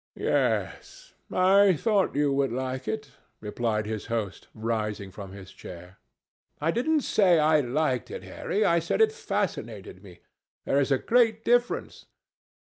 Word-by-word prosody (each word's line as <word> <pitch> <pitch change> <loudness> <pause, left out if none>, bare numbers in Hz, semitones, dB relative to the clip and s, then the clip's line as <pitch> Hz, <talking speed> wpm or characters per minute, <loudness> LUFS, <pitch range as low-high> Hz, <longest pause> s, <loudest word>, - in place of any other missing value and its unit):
"Yes, - - -2 0.2
I 190 +1 +5
thought 205 -1 +1
you 145 -1 +2
would 135 -2 +1
like 130 +1 -4
it," 220 0 -4 0.3
replied 110 0 -2
his 110 -1 -5
host, 110 -5 -4
rising 105 -3 -3
from 95 0 -9
his 95 -1 -11
chair. 90 +1 -12 0.6
"I 160 +3 +1
didn't 300 - +1
say 190 -9 +3
I 155 0 +4
liked 130 0 -1
it, - - -7
Harry. 210 +2 -2
I 170 0 +3
said 165 - -2
it 445 0 +5
fascinated 445 - -4
me. - - -15 0.4
There 140 - +2
is 140 0 0
a 135 - +4
great 225 - +2
difference." 245 0 0
140 Hz, 145 wpm, -27 LUFS, -, 0.6 s, I